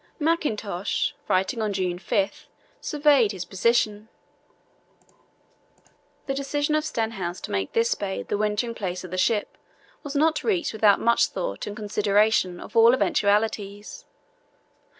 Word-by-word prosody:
Mackintosh, 220 - -1
writing 190 +5 0
on 210 -2 -1
June 180 -2 -2
5, 195 +2 -2 0.3
surveyed 285 -8 +3
his 185 -2 -6
position: 215 +2 0 2.2
"The 270 - -2
decision 290 +2 -1
of 305 0 +2
Stenhouse 220 - -3
to - - -7
make 95 -1 -2
this 230 +1 +2
bay 195 -2 -4
the - - -3
wintering 215 +3 -1
place 185 -5 -4
of 185 - -9
the 185 - -3
ship 210 +2 0 0.4
was 290 -1 -7
not 315 +2 +2
reached 370 - 0
without 210 -2 +4
much 235 0 +3
thought - - -4
and 205 - -5
consideration 210 -3 +1
of - - -11
all 230 +2 +7
eventualities. 205 -3 -1
215 Hz, 130 wpm, -25 LUFS, 195-245 Hz, 2.2 s, all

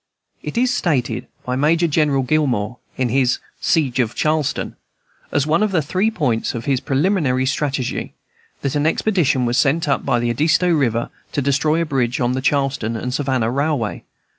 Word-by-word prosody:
It - - -6
is 250 +1 +2
stated 125 - -1 0.2
by 125 - -1
Major 160 +5 +2
General 145 -3 +2
Gillmore, 125 -6 0 0.2
in 130 -2 0
his 125 0 +2 0.2
"Siege 140 -7 +1
of 120 -2 0
Charleston," 155 -2 -1 0.6
as 145 -1 +1
one 160 +5 +2
of 215 -1 +1
the 165 -5 +1
three 185 +9 +1
points 130 - -1
in 115 - -4
his 135 0 +1
preliminary 140 -3 +1
strategy, 135 -1 -2 0.5
that 140 -1 -1
an 145 +1 +1
expedition 160 - +1
was 120 +2 +1
sent 155 +3 +2
up 140 - +1
the 120 -1 +1
Edisto 165 +8 +2
River 120 -7 +1 0.2
to 145 - 0
destroy 150 +4 +2
a - - -3
bridge 125 -5 -1
on 120 0 +1
the 130 +1 -1
Charleston 135 -5 0
and 125 +3 -4
Savannah 130 -4 0
Railway. 140 -4 -1
140 Hz, 170 wpm, -20 LUFS, 125-155 Hz, 0.6 s, is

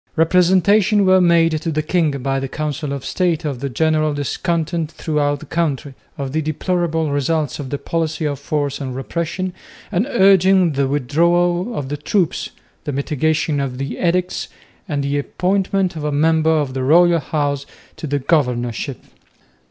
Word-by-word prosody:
Representations 185 +5 +4
were 185 -1 +5
made 165 -3 +3
to 165 - -2
the 155 0 -1
king 165 0 +1
by 135 0 0
the 135 - -3
Council 150 0 -4
of 140 -2 -5
State 175 -3 0
of 140 -5 -3
the 140 +1 -3
general 155 +2 +1
discontent 160 +2 -2
throughout 150 -3 -1
the - - -9
country, 145 -5 -2 0.2
of 135 -2 -4
the 160 +3 0
deplorable 160 0 -1
results 145 +1 -1
of 140 -3 -5
the 145 - -2
policy 160 0 -2
of 145 -2 -2
force 145 -1 -2
and 130 -2 -4
repression, 170 +6 -3 0.4
and 205 +6 0
urging 190 - +4
the 140 -1 0
withdrawal 175 - +1
of 135 -2 -4
the 145 - -3
troops, 170 +3 -1 0.4
the 145 - -2
mitigation 150 +2 0
of 135 -2 -3
the 135 -1 -4
edicts, 180 +1 0 0.4
and 145 -2 -1
the 140 +1 0
appointment 190 +3 0
of 155 - -5
a 150 - -1
member 160 +2 +2
of 150 -5 +1
the 130 - -3
royal 170 +5 +5
house 145 -1 -2 0.3
to 155 - -6
the 145 0 0
governorship. 125 -3 -1
155 Hz, 165 wpm, -19 LUFS, 140-175 Hz, 0.4 s, were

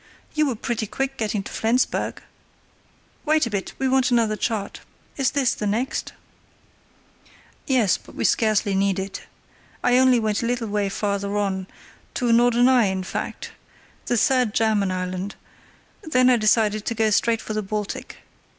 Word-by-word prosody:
You 305 -1 +2
were 255 - -1
pretty 220 0 -3
quick 270 +5 -3
getting 210 -4 -2
to - - -9
Flensburg. 235 +3 0 1.0
Wait 310 -1 +2
a 230 - -5
bit, 200 -2 -3
we 265 - 0
want 260 0 +3
another 230 -3 +2
chart. 210 -2 -3 0.4
Is 270 -3 +1
this 270 -4 +1
the 210 - -3
next?" 230 +6 -2 1.5
"Yes; 245 -8 +3
but - - -17
we - - -3
scarcely 215 -2 +2
need 195 0 +1
it. 190 0 -5 0.6
I 245 +1 +4
only 260 -2 +5
went 215 0 0
a 230 - -1
little 240 -2 -2
way 205 -1 0
farther 200 0 -2
on—to 200 +5 -4
Norderney, 245 -1 +4
in 190 0 -2
fact, - - -5 0.6
the 240 - +1
third 250 -2 +2
German 215 -3 +2
island—then 185 - -3
I - - +5
decided 215 -1 +2
to 230 - -1
go 220 -1 +2
straight 225 +2 +2
for 215 - -6
the 215 - -1
Baltic. 210 0 -5
220 Hz, 150 wpm, -23 LUFS, 205-245 Hz, 1.5 s, only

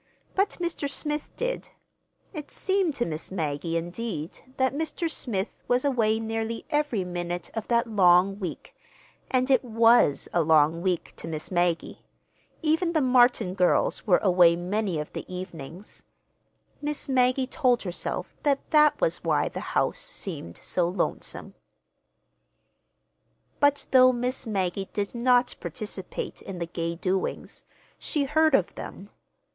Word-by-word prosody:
But 390 +1 +1
Mr. 340 -5 -2
Smith 295 +1 -3
did. - - -3 0.6
It 300 -4 -7
seemed 380 -6 0
to 240 - 0
Miss 155 0 -4
Maggie, 165 -2 -2
indeed, 175 -1 -5 0.2
that 260 -1 +2
Mr. 320 +3 -2
Smith 225 -10 -3
was 250 +3 +2
away 225 -5 +2
nearly 225 0 -3
every 295 -9 +1
minute 175 -1 -4
of 225 -2 -4
that 235 0 +2
long 195 -2 +4
week—and 255 - -5
it 260 - +4
was 230 - +4
a 175 - +3
long 160 +1 +4
week 180 -2 -1
to - - -6
Miss 155 +1 -5
Maggie. 175 -2 0 0.6
Even 325 +2 +1
the 320 - +3
Martin 245 -6 +4
girls 185 +2 +1
were 180 - +6
away 175 -3 +5
many 185 +1 -1
of 150 - -6
the - - -5
evenings. 180 0 -8 0.8
Miss 295 0 -1
Maggie 255 0 +2
told 255 -3 +1
herself 180 -3 -4
that 280 -2 0
that 300 -1 +5
was - - 0
why - - +1
the - - -6 0.2
house - - +1
seemed 145 - -5
so 175 -2 -1
lonesome. 185 - -3 2.1
But 285 0 +3
though 255 -1 +7
Miss 250 0 -2
Maggie 195 -2 -2
did 200 -1 -2
not 245 +1 +3
participate 205 -4 -5
in 195 -2 -7
the 170 - -2
gay 170 0 -3
doings, 185 +2 -3 0.3
she 295 -3 0
heard 310 +1 +3
of 200 -4 +1
them. 200 +2 -9
220 Hz, 140 wpm, -26 LUFS, 175-265 Hz, 2.1 s, though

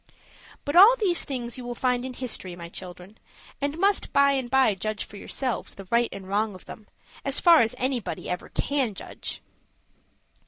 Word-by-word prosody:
But 285 - -2
all 405 +7 +9
these 390 -8 +1
things 245 -2 -4
you - - -7
will 240 0 -5
find 250 0 0
in 260 0 -5
history, 220 -8 -4
my 170 -1 -9
children, 180 +3 -10 0.4
and 285 +2 -2
must 395 +3 +1
by 280 0 +5
and 265 -3 -1
by 260 -4 +4
judge 210 +2 -3
for - - -13
yourselves 250 +4 -3
the 195 -1 -11
right 235 0 +3
and 195 -1 -9
wrong 205 +1 0
of 185 - -13
them, 215 - -11 0.4
as 275 0 +2
far 340 -3 +7
as 225 -1 0
anybody 255 -3 -3
ever 180 - -4
can 265 -7 -1
judge. - - -6
245 Hz, 185 wpm, -26 LUFS, 205-280 Hz, 0.4 s, all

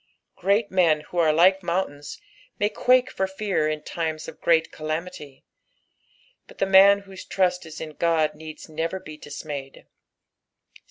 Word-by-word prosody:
Great 200 +4 +1
men 170 -5 +3
who 175 - -5
are 160 -2 +4
like 185 +5 +4
mountains 170 -5 -3 0.4
may 205 - +1
quake 255 +3 +3
for 190 - -1
fear 190 -4 -1
in 155 0 -2
timea 160 -2 -4
of - - -11
great 165 -1 +2
calamity, 155 -2 -6 1.0
but - - -16
the - - +1
man 195 +1 +6
whose 195 -1 -11
trust 180 -1 0
b 160 - -11
in 155 -1 -9
Ood 160 -2 +2
needs 155 0 -10
never 165 +4 -3
be 155 -4 -10
dismayed. 145 -2 -8
170 Hz, 150 wpm, -24 LUFS, 155-190 Hz, 1.0 s, man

